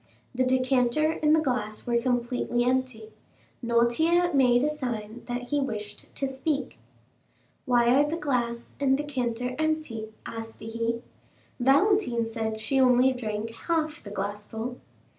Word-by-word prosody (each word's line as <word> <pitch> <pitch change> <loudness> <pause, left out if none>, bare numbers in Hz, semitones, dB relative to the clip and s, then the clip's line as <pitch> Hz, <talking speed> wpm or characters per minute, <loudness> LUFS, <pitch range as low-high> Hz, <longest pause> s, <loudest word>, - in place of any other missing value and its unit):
The 255 +1 +1
decanter 260 +4 +2
and 305 0 +5
the - - +4
glass 215 -7 -2
were 235 -1 +2
completely 245 -1 0
empty. 250 -3 -1 0.5
Noirtier 315 +10 +3
made 250 -2 +4
a 300 - +2
sign 240 -5 -5
that 245 0 -4
he 290 - +1
wished 210 -6 -4
to 275 - -1
speak. 270 0 -2 0.9
"Why 240 -1 +4
are 290 +2 +4
the 325 - -2
glass 240 -6 -2
and 270 -1 +3
decanter 250 -4 -2
empty?" 310 -9 -2
asked 225 0 -6
he; 230 +1 -2 0.6
"Valentine 275 - +3
said 220 -1 -3
she 270 +5 0
only 255 0 +5
drank 220 -2 -4
half 310 +5 -2
the 205 - -9
glassful." 210 +4 -4
245 Hz, 135 wpm, -27 LUFS, 230-275 Hz, 0.9 s, and